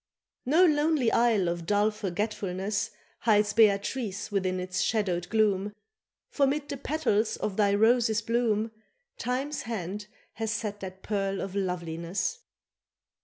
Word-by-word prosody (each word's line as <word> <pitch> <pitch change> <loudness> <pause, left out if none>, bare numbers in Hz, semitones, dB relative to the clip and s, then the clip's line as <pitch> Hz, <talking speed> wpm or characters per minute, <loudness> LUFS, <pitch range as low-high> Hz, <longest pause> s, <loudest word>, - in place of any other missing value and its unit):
No 325 +7 +6
lonely 300 -5 +3
isle 230 -6 +3
of 170 -1 -3
dull 205 +2 +3
forgetfulness 205 +1 -2 0.3
Hides 210 -2 +3
Beatrice 210 0 +2
within 185 -2 0
its 185 +1 -2
shadowed 180 -5 0
gloom, 205 -2 +1 0.5
For 280 -2 +2
'mid 290 +1 -2
the 280 - -3
petals 260 -7 0
of 205 - -3
thy 200 -1 +3
Rose's 225 0 +3
bloom 225 -1 +1 0.5
Time's 270 - -2
hand 205 -2 -5 0.3
has 225 -1 -3
set 210 -2 -3
that 190 -1 -8
pearl 195 -2 -1
of 190 - -4
loveliness. 180 - -2
210 Hz, 125 wpm, -28 LUFS, 195-230 Hz, 0.5 s, No